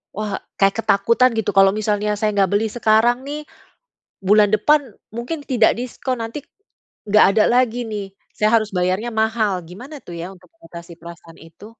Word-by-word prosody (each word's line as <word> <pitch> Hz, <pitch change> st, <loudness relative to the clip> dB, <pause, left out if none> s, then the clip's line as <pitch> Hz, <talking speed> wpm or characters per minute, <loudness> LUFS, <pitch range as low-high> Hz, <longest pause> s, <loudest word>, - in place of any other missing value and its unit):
wah 210 Hz, +1 st, -4 dB, 0.3 s
kayak 195 Hz, 0 st, +3 dB
ketakutan 230 Hz, +6 st, +3 dB
gitu 220 Hz, -, -1 dB
kalau 195 Hz, 0 st, +6 dB
misalnya, 210 Hz, 0 st, -1 dB
"Saya 215 Hz, -, +1 dB
nggak 195 Hz, -2 st, +2 dB
beli 205 Hz, +2 st, +1 dB
sekarang 230 Hz, +1 st, +2 dB
nih, 295 Hz, +1 st, -4 dB, 0.9 s
bulan 210 Hz, +1 st, +5 dB
depan 295 Hz, +8 st, +3 dB, 0.4 s
mungkin 245 Hz, +7 st, -4 dB
tidak 230 Hz, -4 st, +4 dB
diskon 250 Hz, +1 st, -4 dB
nanti, 225 Hz, +6 st, -6 dB, 0.7 s
nggak 210 Hz, +1 st, +6 dB
ada 215 Hz, -, +6 dB
lagi 245 Hz, -1 st, +1 dB
nih 210 Hz, -3 st, -5 dB, 0.3 s
saya 215 Hz, -, +2 dB
harus 215 Hz, -1 st, -5 dB
bayarnya 185 Hz, +6 st, -1 dB
mahal." 220 Hz, -2 st, 0 dB, 0.2 s
gimana 250 Hz, -, -10 dB
tuh 175 Hz, -, -10 dB
ya 170 Hz, -, -5 dB
untuk 180 Hz, -2 st, -20 dB
mengatasi 170 Hz, -1 st, -12 dB
perasaan 170 Hz, -1 st, -13 dB
itu? 165 Hz, +5 st, -15 dB
215 Hz, 165 wpm, -20 LUFS, 195-235 Hz, 0.9 s, kalau